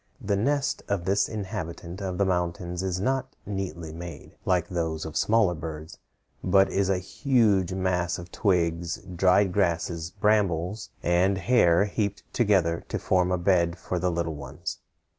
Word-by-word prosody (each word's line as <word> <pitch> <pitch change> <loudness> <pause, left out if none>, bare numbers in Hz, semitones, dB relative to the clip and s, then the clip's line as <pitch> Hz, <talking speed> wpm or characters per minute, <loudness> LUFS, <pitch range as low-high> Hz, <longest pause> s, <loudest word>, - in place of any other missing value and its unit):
The 105 -5 0
nest 135 +6 0
of 95 -4 -1
this 100 +2 +2
inhabitant 95 -3 -5
of 95 -2 -3
the 100 - +2
mountains 90 -1 -1
is 95 -1 -1
not 130 +4 -1
neatly 85 -5 -4
made, 85 -3 -9
like 90 -2 +2
those 80 -3 -2
of 80 - -7
smaller 110 -5 +3
birds, 80 -1 -7 0.4
but 95 +1 +4
is 100 -1 +1
a 95 - +2
huge 100 - +2
mass 90 -2 0
of 85 -1 -9
twigs, 85 -3 +1 0.2
dried 95 +1 +4
grasses, 85 -3 0
brambles, 100 -1 0
and 90 +3 +3
hair 95 -4 +4
heaped 100 -1 -2
together 95 -8 +2
to - - -1
form 90 -1 +1
a 90 - +2
bed 85 -1 +2
for 90 - -3
the 90 +1 +1
little 85 -2 -2
ones. 70 -1 -6
90 Hz, 155 wpm, -26 LUFS, 85-100 Hz, 0.4 s, but